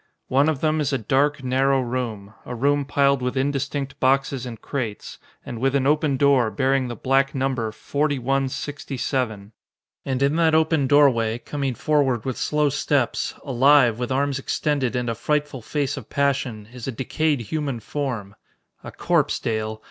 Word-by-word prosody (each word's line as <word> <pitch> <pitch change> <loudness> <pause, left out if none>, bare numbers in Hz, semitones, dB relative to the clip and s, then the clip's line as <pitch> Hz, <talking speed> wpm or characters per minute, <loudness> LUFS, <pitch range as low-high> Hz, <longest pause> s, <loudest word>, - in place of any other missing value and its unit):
"One 140 +4 +3
of 150 -4 -2
them 155 0 +1
is 145 - 0
a 135 - +1
dark, 140 +4 +1
narrow 135 +1 +2
room 120 -5 -4
a 125 - -6
room 140 +3 +1
piled 140 -1 +2
with 125 +1 -2
indistinct 140 0 -2
boxes 135 -1 +1
and 115 -3 -8
crates, 115 -5 -5 0.3
and 120 - -6
with 135 +1 +1
an 135 -1 +2
open 150 -1 +2
door 135 -4 +4
bearing 130 +5 +1
the 120 - -5
black 135 +4 +1
number 130 -4 -1
4167. 135 -4 -2 0.5
And 135 0 -1
in 140 +3 +2
that 160 -2 +3
open 160 -3 +2
doorway, 125 -6 +4
coming 135 +1 -3
forward 135 -6 +1
with 130 -2 -2
slow 150 -1 +1
steps 140 -2 0
alive, 130 -3 +4
with 125 +1 -3
arms 140 0 0
extended 135 -2 -1
and 125 -1 -1
a 115 - 0
frightful 145 +2 -2
face 145 +4 -2
of 135 - -9
passion 130 -6 -1
is 125 -1 -8
a - - -1
decayed 145 +3 -1
human 140 0 -3
form. 115 -5 -4 0.5
A - - -8
corpse, - - +1
Dale. 110 -1 -3
135 Hz, 165 wpm, -23 LUFS, 125-145 Hz, 0.5 s, door